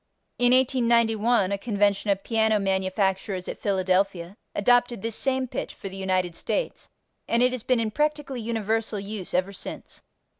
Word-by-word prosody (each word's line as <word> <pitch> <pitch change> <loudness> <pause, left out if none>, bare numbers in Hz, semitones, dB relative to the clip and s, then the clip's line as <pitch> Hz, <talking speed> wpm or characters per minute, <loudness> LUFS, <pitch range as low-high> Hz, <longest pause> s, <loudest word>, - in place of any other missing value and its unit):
In 245 0 +4
1891 235 -4 +3
a 200 - -1
convention 205 -2 +1
of 195 -1 +1
piano 220 -1 +2
manufacturers 190 -1 -1
at - - -6
Philadelphia 185 -2 0 0.2
adopted 245 0 +2
this 225 -1 -2
same 265 -1 +1
pitch - - -5
for 195 - -7
the 190 - -10
United 185 -2 -1
States, - - -3 0.4
and 235 +1 +2
it 250 - +4
has 255 -2 -4
been 250 +1 +1
in 220 -1 -1
practically 295 -1 -1
universal 225 -1 -1
use 200 -2 -6
ever 185 +2 0
since. - - -9
215 Hz, 155 wpm, -25 LUFS, 195-240 Hz, 0.4 s, In